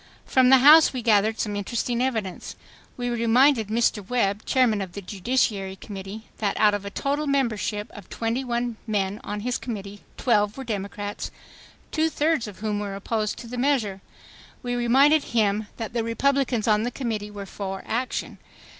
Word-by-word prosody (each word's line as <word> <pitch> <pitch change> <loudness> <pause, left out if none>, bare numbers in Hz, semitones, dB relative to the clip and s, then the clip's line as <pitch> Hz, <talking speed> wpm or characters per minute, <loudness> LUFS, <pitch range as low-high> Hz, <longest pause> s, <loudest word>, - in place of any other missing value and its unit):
From 260 -1 +4
the 265 - +8
House 300 +5 +8
we 255 -2 -4
gathered 220 -1 +3
some 210 -2 -1
interesting 235 +4 -2
evidence. 220 -8 -3 0.4
We 245 -1 -2
reminded 235 +1 +3
Mr. 220 -1 +1
Webb, 210 -4 0
Chairman 240 -6 +2
of 185 -2 -6
the 200 - -6
Judiciary 200 -1 -1
Committee, 195 +2 -8 0.2
that 205 -2 -1
out 210 -1 +5
of 205 -1 -3
a - - -3
total 285 +8 -2
membership 225 -6 0
of 205 -4 -12
twenty 230 +3 -2
one 240 -2 -2
men 205 -1 -1
on 205 0 -4
his 245 +2 -2
committee, 205 -4 -6 0.2
twelve 210 -3 +2
were 270 - -5
Democrats, 205 -2 -4 0.6
two 320 0 +1
thirds 305 -6 0
of 205 -1 -11
whom 210 -1 -1
were 200 -1 -4
opposed 210 +1 -2
to 235 - -9
the 245 +1 -5
measure; 240 -8 0 0.6
we 245 0 -2
reminded 270 +5 +4
him 210 0 +2
that 225 -1 -5
the 235 -2 0
Republicans 250 0 +1
on 210 -1 +4
the 240 - -1
committee 225 -5 -4
were 205 -1 -7
for 195 0 -6
action. 250 +3 -3
225 Hz, 170 wpm, -25 LUFS, 205-250 Hz, 0.6 s, the